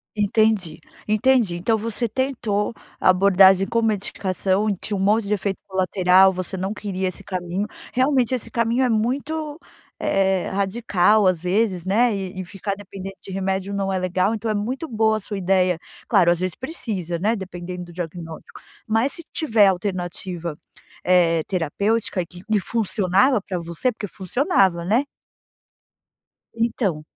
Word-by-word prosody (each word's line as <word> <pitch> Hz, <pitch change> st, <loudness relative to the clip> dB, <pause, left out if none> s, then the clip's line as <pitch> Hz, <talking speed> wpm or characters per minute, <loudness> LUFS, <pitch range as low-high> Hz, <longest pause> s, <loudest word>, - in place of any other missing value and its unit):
Entendi, 210 Hz, -5 st, +1 dB, 0.3 s
entendi. 215 Hz, -3 st, +3 dB
Então 220 Hz, +6 st, +1 dB
você 230 Hz, +2 st, -2 dB
tentou 230 Hz, -4 st, -1 dB, 0.3 s
abordagem 190 Hz, 0 st, +5 dB
com 230 Hz, +2 st, +1 dB
medicação. 200 Hz, -2 st, 0 dB
Tinha 210 Hz, -, -4 dB
um -, -, -3 dB
monte 210 Hz, +2 st, +2 dB
de 205 Hz, -, -2 dB
efeito 200 Hz, -1 st, -2 dB
colateral. 190 Hz, 0 st, +4 dB
Você 185 Hz, +1 st, -4 dB
não 190 Hz, +3 st, -2 dB
queria 190 Hz, -3 st, -3 dB
esse 185 Hz, -, -9 dB
caminho. 185 Hz, +1 st, -3 dB, 0.3 s
Realmente 260 Hz, -1 st, +2 dB
esse 230 Hz, -2 st, -5 dB
caminho 235 Hz, +3 st, +1 dB
é 250 Hz, -, +2 dB
muito, 285 Hz, +7 st, -1 dB, 0.4 s
eh, 190 Hz, -1 st, +1 dB
radical, 200 Hz, 0 st, +2 dB
às 180 Hz, -3 st, +2 dB
vezes, 185 Hz, -1 st, 0 dB
né, 225 Hz, +4 st, +3 dB
e 190 Hz, -2 st, -5 dB
e -, -, -4 dB
ficar 195 Hz, +2 st, -4 dB
dependente 195 Hz, -1 st, -9 dB
de -, -, -10 dB
remédio 190 Hz, +1 st, -2 dB
não 195 Hz, -1 st, -1 dB
é 190 Hz, -, 0 dB
legal. 185 Hz, +3 st, 0 dB
Então 220 Hz, 0 st, -3 dB
é -, -, 0 dB
muito 250 Hz, +10 st, -3 dB
boa 220 Hz, -4 st, +1 dB
a -, -, -4 dB
sua 205 Hz, 0 st, -5 dB
ideia 185 Hz, -2 st, +2 dB, 0.3 s
claro, 185 Hz, -6 st, +4 dB
às 175 Hz, 0 st, +1 dB
vezes 185 Hz, -2 st, -1 dB
precisa, 205 Hz, -, -4 dB
né, 210 Hz, +6 st, +1 dB
dependendo 180 Hz, -3 st, -6 dB
do 175 Hz, -, -13 dB
diagnóstico. 165 Hz, -2 st, -8 dB, 0.3 s
Mas 225 Hz, +5 st, +1 dB
se 335 Hz, -, -4 dB
tiver 225 Hz, -10 st, +3 dB
alternativa, 180 Hz, -3 st, -3 dB, 0.5 s
eh, 170 Hz, -3 st, +4 dB
terapêutica 200 Hz, +4 st, 0 dB
e 175 Hz, -, -3 dB
que 180 Hz, +2 st, -14 dB
que 215 Hz, -1 st, +1 dB
funcionava 205 Hz, +3 st, +2 dB
pra 190 Hz, -2 st, -4 dB
você, 170 Hz, +9 st, -1 dB
porque 220 Hz, -3 st, -6 dB
funcionava, 190 Hz, -, +1 dB
né? 225 Hz, +10 st, +2 dB, 1.5 s
Então. 225 Hz, -8 st, -1 dB
195 Hz, 150 wpm, -22 LUFS, 185-225 Hz, 1.5 s, abordagem